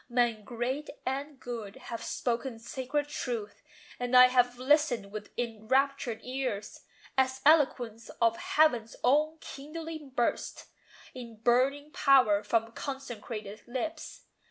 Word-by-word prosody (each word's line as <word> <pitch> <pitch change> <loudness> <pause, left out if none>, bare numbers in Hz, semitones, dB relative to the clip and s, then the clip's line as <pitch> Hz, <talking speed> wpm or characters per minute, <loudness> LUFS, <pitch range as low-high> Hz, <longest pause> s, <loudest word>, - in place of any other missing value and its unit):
Men 240 -3 +1
great 250 +6 -3 0.2
and 275 +2 -3
good 230 -6 -6
have 245 -3 -7
spoken 240 0 -2
sacred 260 +5 -3
truth; 235 -8 -4 0.4
And 245 0 +3
I 250 0 +10
have 245 -1 +3
listened 255 -6 +2
with 210 0 -7
enraptured 245 +2 0
ears, 255 -5 -3 0.4
As 260 0 +2
eloquence 250 -7 +3
of 230 -1 +4
Heaven's 245 -8 +2
own 300 +5 +3
kindling 315 +1 -7
burst 245 -2 -1 0.5
In 235 -3 -9
burning 260 +6 +2
power 250 -10 +5
from 225 +2 0
consecrated 225 -6 -6
lips. 310 +6 -5
250 Hz, 115 wpm, -30 LUFS, 230-275 Hz, 0.5 s, I